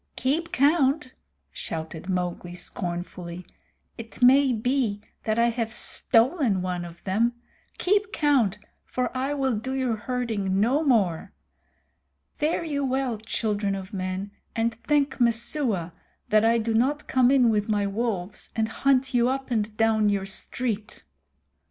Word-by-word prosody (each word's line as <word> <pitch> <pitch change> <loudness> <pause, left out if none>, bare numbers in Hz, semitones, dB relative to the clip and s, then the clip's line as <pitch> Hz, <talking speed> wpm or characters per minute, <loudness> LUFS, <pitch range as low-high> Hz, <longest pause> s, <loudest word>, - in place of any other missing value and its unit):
"Keep 315 +6 -1
count!" 285 -3 +2 0.4
shouted 160 +2 -6
Mowgli 180 -1 -2
scornfully. 175 0 -6 0.5
"It 225 0 -9
may 265 +2 +6
be 240 -2 0 0.3
that 215 0 0
I 235 0 +4
have 230 -1 -2
stolen 235 - +2
one 180 -1 -2
of 170 0 -12
them. 225 +5 +1 0.4
Keep 405 +2 +1
count, 265 - +2 0.3
for 250 0 -3
I 270 +3 -1
will 265 -4 0
do 260 +5 -3
your 255 -4 0
herding 215 -6 -1
no 260 +9 +2
more. 205 - +1 1.0
Fare 315 +3 0
you 290 -3 -2
well, 260 -4 -1
children 210 -2 -1
of 190 +2 -8
men, 185 +1 -3 0.2
and 230 0 +1
thank 280 +4 0
Messua 230 - 0 0.4
that 215 0 +4
I 230 +1 +4
do 225 0 -1
not 270 +6 +1
come 255 -1 +4
in 255 -4 +5
with 210 0 0
my 205 -1 +1
wolves 200 -2 -2
and 220 -1 0
hunt 265 +2 +1
you 245 0 +3
up 270 0 -3
and 215 -2 -1
down 220 -2 +3
your 200 -1 0
street." 210 +2 -4
230 Hz, 140 wpm, -26 LUFS, 200-265 Hz, 1.0 s, may